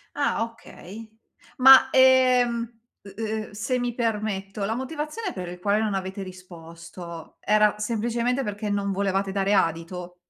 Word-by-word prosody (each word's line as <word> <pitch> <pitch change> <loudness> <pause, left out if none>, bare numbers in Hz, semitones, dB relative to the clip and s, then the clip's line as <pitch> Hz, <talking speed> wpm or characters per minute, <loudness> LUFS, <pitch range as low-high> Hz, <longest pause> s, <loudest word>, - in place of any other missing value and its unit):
Ah 285 -5 0
okay. 225 -2 -10 0.5
Ma, 265 0 +8
ehm, 255 -2 +4 0.4
u 200 - -12
uhm, 220 -1 -4
se 220 +5 -2
mi 245 -1 -2
permetto, 210 -4 -2
la 220 +3 -2
motivazione 300 - -4
per 180 -2 -6
il 180 0 -9
quale 205 +3 +1
non 215 -2 -1
avete 195 +1 -4
risposto 170 -2 -11
era 210 0 +2
semplicemente 235 +4 -1
perché 210 -1 -4
non 200 -1 -1
volevate 195 0 -1
dare 195 +1 0
adito? 175 0 -1
210 Hz, 140 wpm, -24 LUFS, 190-240 Hz, 0.5 s, Ma